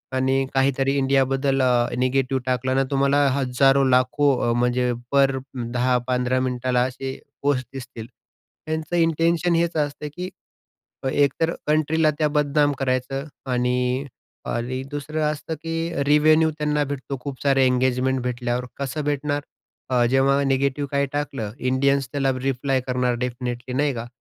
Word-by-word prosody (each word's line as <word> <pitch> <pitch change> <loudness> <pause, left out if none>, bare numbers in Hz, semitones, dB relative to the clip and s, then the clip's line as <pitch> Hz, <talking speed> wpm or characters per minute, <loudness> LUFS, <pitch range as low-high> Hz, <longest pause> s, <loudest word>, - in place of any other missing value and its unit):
आणि 135 +1 +1
काहीतरी 135 0 +2
इंडियाबद्दल 135 0 +2
अ, 125 -2 +3
निगेटिव्ह 130 +1 +1
टाकलं 130 0 0
ना, 135 - +3
तुम्हाला 140 +1 +3
हजारो, 135 +1 +3
लाखो 130 -1 +2
म्हणजे 125 +1 +1 0.2
पर 135 -1 +3 0.4
10-15 125 0 +1
मिनिटाला 125 -1 0
असे 130 +1 -6 0.2
पोस्ट 135 -3 +1
दिसतील. 125 -4 -8 0.6
त्यांचं 160 +2 -3
इंटेंशन 165 +1 +2
हेच 170 0 +1
असतं, 150 0 -2
की 180 +1 -4 0.8
एक 140 -2 +3
तर 165 0 +2
कंट्रीला 155 +1 +2
त्या 155 - +2
बदनाम 145 0 +2
करायचं. 135 +1 -1 0.3
आणि 125 +2 0 0.4
आणि 125 +2 -2
दुसरं 150 +2 -3
असतं 155 +2 -5
की 165 -1 -2
रिवेन्यू 155 +2 +4
त्यांना 150 -1 +1
भेटतो 140 0 -5
खूप 135 0 -7
सारे 135 -1 +3
एंगेजमेंट 130 +1 +1
भेटल्यावर 125 0 -2
कसं 140 +2 -3
भेटणार? 145 0 -1 0.5
अ, 125 -2 +3
जेव्हा 135 +1 +3
निगेटिव्ह 140 +1 0
काही 140 0 +2
टाकलं 140 -7 -3
इंडियन्स 135 +1 +1
त्याला 135 -2 +1
रिप्लाय 135 0 0
करणार 125 -1 0
डेफिनिटली 125 0 -4
नाही 145 0 +1
का? 115 0 -5
135 Hz, 135 wpm, -23 LUFS, 125-145 Hz, 0.8 s, रिवेन्यू